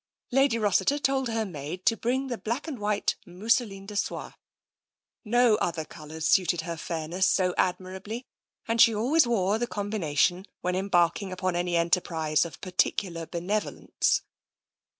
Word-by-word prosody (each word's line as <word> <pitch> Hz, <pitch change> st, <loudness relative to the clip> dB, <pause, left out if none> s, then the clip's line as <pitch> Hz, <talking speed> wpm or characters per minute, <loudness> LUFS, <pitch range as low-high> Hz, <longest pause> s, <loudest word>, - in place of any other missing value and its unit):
Lady 270 Hz, -2 st, +3 dB
Rossiter 215 Hz, +6 st, +2 dB
told 270 Hz, -2 st, +1 dB
her 225 Hz, -1 st, -1 dB
maid 175 Hz, +1 st, -7 dB
to 225 Hz, -, +4 dB
bring 255 Hz, +4 st, -1 dB
the 250 Hz, -3 st, -3 dB
black 235 Hz, +8 st, -3 dB
and 280 Hz, -7 st, -5 dB
white 210 Hz, 0 st, 0 dB
mousseline 200 Hz, +1 st, -1 dB
de 210 Hz, +1 st, -8 dB
sole. 200 Hz, -, -3 dB, 0.9 s
No 240 Hz, -1 st, +4 dB
other 165 Hz, -2 st, -2 dB
colours 155 Hz, +1 st, -6 dB
suited 175 Hz, -1 st, +3 dB
her 170 Hz, +1 st, -4 dB
fairness 165 Hz, +3 st, -1 dB
so 180 Hz, -2 st, +2 dB
admirably, 190 Hz, +6 st, -2 dB, 0.4 s
and 230 Hz, 0 st, +3 dB
she 225 Hz, -, +7 dB
always 255 Hz, +7 st, +3 dB
wore 210 Hz, -2 st, +1 dB
the 240 Hz, -, -1 dB
com 205 Hz, -2 st, -4 dB
bination 175 Hz, -1 st, +1 dB, 0.2 s
when 180 Hz, 0 st, -1 dB
embarking 185 Hz, 0 st, +1 dB
upon 185 Hz, -1 st, -2 dB
any 175 Hz, 0 st, 0 dB
enterprise 165 Hz, -2 st, +1 dB
of 170 Hz, -, -9 dB
par 185 Hz, -, -7 dB
ticular 175 Hz, -3 st, 0 dB
benevolence. 190 Hz, +5 st, -1 dB
195 Hz, 150 wpm, -27 LUFS, 175-225 Hz, 0.9 s, she